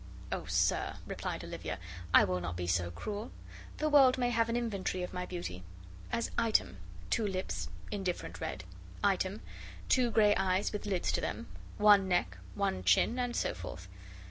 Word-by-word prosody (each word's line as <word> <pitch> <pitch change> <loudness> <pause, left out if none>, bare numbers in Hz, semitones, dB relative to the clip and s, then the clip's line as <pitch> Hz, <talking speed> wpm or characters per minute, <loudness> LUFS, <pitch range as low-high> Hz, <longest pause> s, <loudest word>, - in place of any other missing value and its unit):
"Oh, - - -2
sir," - - +1
replied - - -4
Olivia, - - -5 0.3
"I - - +8
will 90 -1 0
not 85 0 -4
be 90 - -2
so 85 0 +1
cruel. 205 - -5 0.5
The 305 - 0
world 275 -4 +6
may 245 -1 +1
have 230 -1 +2
an 230 - +1
inventory 200 -6 -2
of 180 - -5
my 180 0 -3
beauty. 170 - -5 0.5
As, 230 - -1
item, 215 - +2 0.3
two 220 - +2
lips, 185 -1 -3 0.2
indifferent 190 -4 -3
red; - - -4 0.4
item, - - +1 0.5
two 250 -2 +4
gray 210 -2 +5
eyes 190 +2 +1
with 210 0 -4
lids 190 -3 0
to - - 0
them; - - -3 0.3
one 205 -2 +6
neck; 180 -1 0 0.2
one 145 - -1
chin; 95 - +3
and 245 -1 -1
so - - 0
forth. 90 0 -8
195 Hz, 170 wpm, -32 LUFS, -, 0.5 s, I